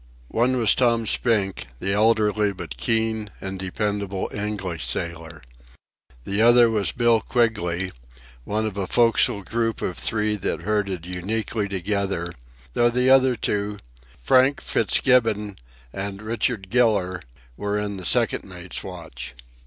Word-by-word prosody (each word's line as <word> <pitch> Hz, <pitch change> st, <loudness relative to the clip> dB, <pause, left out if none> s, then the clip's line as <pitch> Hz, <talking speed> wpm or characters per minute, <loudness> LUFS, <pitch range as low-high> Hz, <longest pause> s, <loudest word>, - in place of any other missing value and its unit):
One 125 Hz, +3 st, +1 dB
was 115 Hz, -3 st, +4 dB
Tom 115 Hz, -2 st, +2 dB
Spink, 105 Hz, -4 st, +1 dB
the 95 Hz, +8 st, -2 dB
elderly 105 Hz, -1 st, +3 dB
but 95 Hz, -, -7 dB
keen 110 Hz, -2 st, 0 dB
and 95 Hz, 0 st, -5 dB
dependable 100 Hz, 0 st, -2 dB
English 100 Hz, -5 st, -3 dB
sailor. 80 Hz, -2 st, -4 dB, 0.8 s
The 100 Hz, -, -1 dB
other 120 Hz, 0 st, +6 dB
was 105 Hz, -3 st, +1 dB
Bill 120 Hz, -2 st, +3 dB
Quigley, 95 Hz, -7 st, 0 dB, 0.5 s
one 110 Hz, -, -1 dB
of 105 Hz, -2 st, -4 dB
a 95 Hz, -2 st, -2 dB
forecastle 115 Hz, -2 st, +3 dB
group 115 Hz, +3 st, -1 dB
of 90 Hz, -, -3 dB
three 105 Hz, -1 st, 0 dB
that 95 Hz, -, -2 dB
herded 100 Hz, -5 st, -1 dB
uniquely 100 Hz, +4 st, -2 dB
together, 95 Hz, -2 st, -2 dB, 0.4 s
though 120 Hz, 0 st, +4 dB
the 125 Hz, +2 st, +2 dB
other 130 Hz, -1 st, +5 dB
two, 105 Hz, -2 st, -2 dB, 0.4 s
Frank 130 Hz, -, +4 dB
Fitzgibbon 110 Hz, -6 st, +1 dB, 0.4 s
and 100 Hz, 0 st, -4 dB
Richard 110 Hz, -3 st, -2 dB
Giller, 105 Hz, -7 st, +2 dB, 0.3 s
were 105 Hz, +5 st, -2 dB
in 105 Hz, -1 st, -3 dB
the 90 Hz, -, -7 dB
second -, -, +2 dB
mate's -, -, -8 dB
watch. -, -, -8 dB
105 Hz, 130 wpm, -23 LUFS, 95-115 Hz, 0.8 s, other